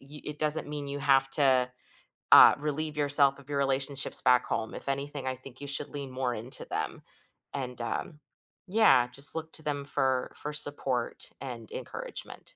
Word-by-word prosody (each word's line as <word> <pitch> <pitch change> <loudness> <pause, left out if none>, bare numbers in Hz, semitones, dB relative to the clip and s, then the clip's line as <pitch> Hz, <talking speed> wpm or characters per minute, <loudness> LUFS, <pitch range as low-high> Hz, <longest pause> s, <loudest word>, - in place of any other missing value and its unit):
y 145 +2 -13
it 150 0 -8
doesn't 155 0 +1
mean 145 -1 -7
you 140 0 -6
have 135 -1 +2
to, 130 -3 +1 0.6
uh, - - +8
relieve 150 +1 -5
yourself 145 -1 +5
of 140 +1 -17
your 140 - -3
relationships 135 0 +4
back 125 -1 +2
home. 110 -1 -5
If - - -7
anything, 140 0 -5
I 130 - -3
think 130 0 -12
you 145 - -7
should 140 +1 -1
lean 140 -2 -8
more 130 -1 -4
into 120 +4 -7
them, - - -5 0.5
and, 125 -3 -6
um, 150 +5 -6 0.5
yeah, 195 - +3
just 140 +5 +5
look 160 0 -7
to 160 - -2
them 145 -1 -4
for 130 -2 0
for 150 - -1
support 140 -4 +1
and 120 -5 -9
encouragement. - - -8
140 Hz, 175 wpm, -27 LUFS, 130-145 Hz, 0.6 s, uh